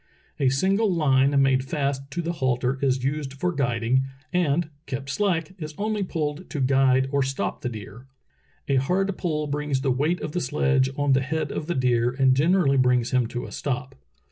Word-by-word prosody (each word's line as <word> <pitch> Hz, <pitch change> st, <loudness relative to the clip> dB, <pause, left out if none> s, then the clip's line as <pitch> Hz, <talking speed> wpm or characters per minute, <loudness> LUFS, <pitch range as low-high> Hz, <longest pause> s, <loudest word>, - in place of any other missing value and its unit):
A 135 Hz, -3 st, +3 dB
single 195 Hz, -, +2 dB
line 140 Hz, -4 st, +3 dB
made 130 Hz, -1 st, +2 dB
fast 140 Hz, -1 st, -2 dB
to 175 Hz, +4 st, -3 dB
the 170 Hz, -, -1 dB
halter 130 Hz, -4 st, 0 dB
is 130 Hz, -2 st, +1 dB
used 140 Hz, 0 st, -2 dB
for 180 Hz, +6 st, -1 dB
guiding, 125 Hz, -3 st, +1 dB, 0.3 s
and, 165 Hz, -2 st, +1 dB, 0.2 s
kept 135 Hz, +1 st, -4 dB
slack, 175 Hz, -2 st, 0 dB
is 155 Hz, -2 st, -6 dB
onh'^ 210 Hz, -1 st, -2 dB
pulled 150 Hz, +2 st, -3 dB
to 150 Hz, -, -4 dB
guide 130 Hz, 0 st, +3 dB
or 140 Hz, -1 st, +2 dB
stop 135 Hz, 0 st, -2 dB
the 125 Hz, -, -2 dB
deer. 110 Hz, +3 st, -9 dB, 0.6 s
A 140 Hz, -, +2 dB
hard 185 Hz, +8 st, +1 dB
pull 155 Hz, -4 st, -2 dB
brings 145 Hz, -2 st, -2 dB
the 135 Hz, -1 st, +1 dB
weight 150 Hz, +8 st, 0 dB
of -, -, -4 dB
the 180 Hz, -, -2 dB
sledge 135 Hz, 0 st, +1 dB
on 145 Hz, -1 st, +2 dB
the 130 Hz, -, +3 dB
head 155 Hz, +3 st, -2 dB
of 155 Hz, -, -4 dB
the 175 Hz, -, -1 dB
deer 120 Hz, -2 st, +2 dB
and 130 Hz, 0 st, +3 dB
generally 150 Hz, -1 st, +3 dB
brings 125 Hz, -2 st, +2 dB
him 125 Hz, -3 st, +2 dB
to 120 Hz, +1 st, -5 dB
a -, -, -9 dB
stop. 135 Hz, -1 st, -3 dB
140 Hz, 195 wpm, -25 LUFS, 130-155 Hz, 0.6 s, A